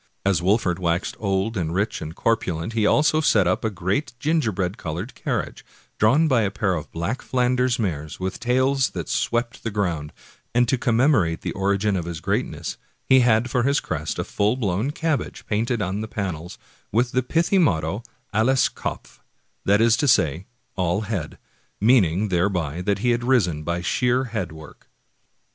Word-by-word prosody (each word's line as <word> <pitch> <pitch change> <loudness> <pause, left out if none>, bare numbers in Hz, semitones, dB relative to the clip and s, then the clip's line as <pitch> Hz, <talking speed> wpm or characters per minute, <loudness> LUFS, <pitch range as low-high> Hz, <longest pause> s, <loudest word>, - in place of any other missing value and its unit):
As 100 -3 +2
Wolfert 95 -1 +1
waxed 85 0 -1
old 100 +2 -1
and 85 -3 -2
rich 100 +4 -1
and 80 +2 -6
corpulent 100 -4 -1
he 110 -2 +2
also 155 +1 +3
set 105 - +4
up 90 - 0
a 110 - +1
great 100 - -2
gingerbread 110 - 0
colored 85 +8 -5
carriage, - - -3 0.4
drawn 140 +9 +4
by 130 -6 +3
a 100 - +1
pair 100 -1 0
of 80 -4 -5
black 85 +10 -3
Flanders 125 0 +1
mares 80 - -3
with 95 0 -3
tails 130 +2 +2
that 85 - -3
swept 120 - -1
the 115 - -1
ground; 85 -8 -2 0.4
and 120 0 +4
to 135 - +2
commemorate 120 - +2
the - - -3
origin 100 +1 0
of 85 -3 -2
his 85 -2 -5
greatness - - -2 0.3
he 130 - +6
had 120 0 +3
for 125 - +2
his 140 +4 +2
crest 80 0 -4
a - - -1
full 105 +3 0
blown 105 +1 0
cabbage 160 -1 -2
painted 110 +1 0
on 95 +3 -2
the 110 - -4
panels, 90 -5 -5 0.3
with 120 +3 +1
the 130 - +2
pithy 165 +8 +1
motto, 90 - +1 0.3
ALLES 125 +5 +3
KOPF, - - -6 0.5
that 100 +2 +4
is 115 -1 +5
to 145 - +1
say, 80 - +2 0.3
all 90 +1 0
HEAD, 100 -8 -4 0.4
meaning 105 -4 +3
thereby 90 -3 0
that 100 +1 0
he 120 - +4
had 120 0 0
risen 105 - +2
by 85 +2 -2
sheer 125 +7 +1
head 110 -9 -4
work. 80 -1 -13
105 Hz, 175 wpm, -23 LUFS, 90-125 Hz, 0.5 s, he